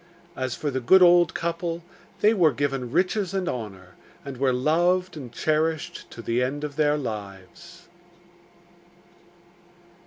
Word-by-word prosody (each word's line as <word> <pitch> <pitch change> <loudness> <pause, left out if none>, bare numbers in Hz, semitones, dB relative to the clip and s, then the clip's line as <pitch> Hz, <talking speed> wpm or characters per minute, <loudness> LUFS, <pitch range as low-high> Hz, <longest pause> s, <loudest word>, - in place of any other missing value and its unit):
As 130 -1 -3
for 145 - -3
the 130 - -2
good 185 +10 +6
old 175 -2 +5
couple, 170 0 -3 0.4
they 215 +2 +5
were 175 -8 +4
given 135 -3 -2
riches 185 +4 0
and 190 -2 -1
honour, 105 - -6 0.4
and 140 -2 -7
were 135 0 +2
loved 175 +7 +1
and 130 -6 -8
cherished 155 +4 -1
to 115 - -10
the 115 +2 0
end 140 +4 -2
of 145 -2 -5
their 150 -1 +2
lives. 110 - -8
150 Hz, 135 wpm, -25 LUFS, 125-175 Hz, 0.4 s, good